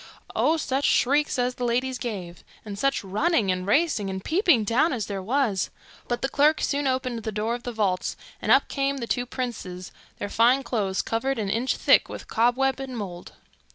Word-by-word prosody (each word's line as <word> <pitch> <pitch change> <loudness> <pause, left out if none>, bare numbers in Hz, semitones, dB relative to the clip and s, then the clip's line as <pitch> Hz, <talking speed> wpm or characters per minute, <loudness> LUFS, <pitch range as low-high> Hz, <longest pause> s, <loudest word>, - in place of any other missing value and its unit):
Oh, 320 +2 +3
such 275 -2 -1
shrieks 290 +4 +2
as 250 0 +1
the 250 - -6
ladies 250 +2 0
gave! 185 -7 -6 0.2
and 200 -2 -6
such 275 -2 +1
running 210 - +1
and 185 +1 -3
racing 255 - +2
and 190 0 -5
peeping 335 - +3
down 245 +9 +2
as 225 -5 -2
there 200 -2 -4
was! 225 -2 0 0.4
but 240 +1 -2
the - - +2
clerk 295 +3 +3
soon 285 0 0
opened 255 -3 -1
the 220 - -4
door 215 +2 -1
of 240 - -4
the 245 - -5
vault, 200 -5 -1 0.3
and - - 0
up - - +5
came 275 0 -1
the 240 - -3
two 245 +1 -1
princes, 190 -8 -5 0.3
their - - -4
fine 240 +6 +3
clothes 205 -6 -1
covered 265 +4 -1
an 205 -3 -2
inch 235 +5 0
thick - - +4
with - - -8
cobwebs 255 +4 +2
and 260 -2 -6
mould. 180 -5 -7
240 Hz, 195 wpm, -25 LUFS, 205-270 Hz, 0.4 s, up